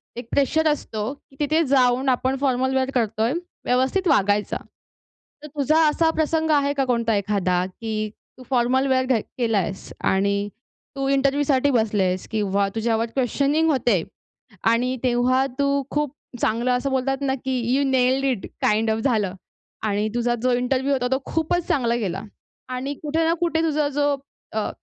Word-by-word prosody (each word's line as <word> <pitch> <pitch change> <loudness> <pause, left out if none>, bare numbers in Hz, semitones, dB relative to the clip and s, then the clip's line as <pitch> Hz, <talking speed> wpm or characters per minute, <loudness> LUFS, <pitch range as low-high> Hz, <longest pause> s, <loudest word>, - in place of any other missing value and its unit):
एक 240 0 -7
प्रेशर 315 +3 +2
असतो 235 -6 -2
की 280 -1 -22
तिथे 310 +2 +2
जाऊन 260 0 +3
आपण 260 +1 +1
फॉर्मल 260 -1 +1
वेअर 265 0 +1
करतोय, 225 0 +1 0.3
व्यवस्थित 260 +10 +1
वागायच. 205 - +2
तर 300 0 -12
तुझा 300 +2 +2
असा 320 +2 +2
प्रसंग 320 0 0
आहे 285 -1 +3
का 275 -2 0
कोणता 235 -3 +1
एखादा? 185 -3 0
की 215 +2 -4 0.3
तू 255 - -12
फॉर्मल 260 +1 +2
वेअर 260 -1 +2
घ 255 -2 +2 0.2
केलायेस 215 -6 -1 0.2
आणि 200 +1 +1 0.5
तू 275 0 -2
इंटरव्ह्यूसाठी 275 0 +2
बसलेस 205 -6 +1
किंवा 200 -2 +1
तुझ्यावर 225 0 +1
क्वेशनिंग 280 +5 +1
होते 240 - +2 0.7
आणि 250 +2 +1
तेव्हा 255 +1 +2
तू 280 0 +2
खूप 295 -2 -1 0.3
चांगलं 235 +3 +1
असं 250 +2 0
बोलतात 265 +1 0
ना 270 -1 0
की 260 -1 0 0.2
you 280 - +2
nailed 260 +1 +2
it 255 -7 -1 0.2
kind 220 +1 +2
of 220 - 0
झालं. 215 -6 0 0.5
आणि 210 0 0
तुझा 240 0 +1
जो 255 - +3
इंटरव्ह्यू 255 +3 +1
होता 250 -2 0
तो 265 - +2
खूपच 325 +2 -1
चांगला 235 -4 +1
गेला. 195 -4 -3 0.5
आणि 255 +3 -3
कुठे 310 +2 0
ना 330 - +3
कुठे 330 -2 +1
तुझा 305 -2 +1
जो 290 0 +1 0.4
अ, 215 -1 -1
255 Hz, 155 wpm, -23 LUFS, 225-280 Hz, 0.7 s, जाऊन